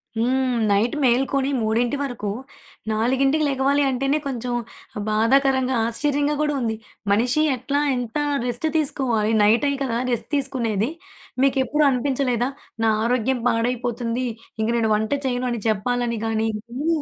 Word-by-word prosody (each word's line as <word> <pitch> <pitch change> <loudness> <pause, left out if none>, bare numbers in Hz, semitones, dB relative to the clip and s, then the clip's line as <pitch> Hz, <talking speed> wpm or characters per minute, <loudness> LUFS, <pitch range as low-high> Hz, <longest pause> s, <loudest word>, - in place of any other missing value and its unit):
హ్మ్, 255 +3 +1 0.2
నైట్ 210 +4 +2
మేల్కొని 265 +2 +2
3 235 +5 +1
వరకు, 245 -7 -4 0.6
4కి 265 +7 +2
లెగవాలి 275 +1 +2
అంటేనే 275 +3 0
కొంచెం 250 -2 -3 0.6
బాధాకరంగా, 260 +4 +3
ఆశ్చర్యంగా 290 +4 0
కూడా 300 -1 +1
ఉంది. 225 -1 -1 0.4
మనిషి 245 +8 +2
ఎట్లా, 275 +4 -1
ఎంత 245 +1 -3 0.3
రెస్టు 245 +6 -1
తీసుకోవాలి! 240 -7 0
నైటే 230 +7 +4
కదా 235 -3 -1
రెస్ట్ 235 - -2
తీసుకునేది. 235 -5 0 0.5
మీకెప్పుడూ 275 +2 +2
అనిపించలేదా? 255 -1 0 0.3
నా 225 - +4
ఆరోగ్యం 245 +1 +1
పాడైపోతుంది. 240 +1 -1 0.4
ఇంక 220 - 0
నేను 220 -2 +1
వంట 215 +3 -1 0.2
చేయను 250 0 -1
అని 235 -3 -3
చెప్పాలని 235 +2 -1
గాని 225 0 0 0.4
ఊ - - 0
245 Hz, 125 wpm, -22 LUFS, 230-270 Hz, 0.6 s, నైటే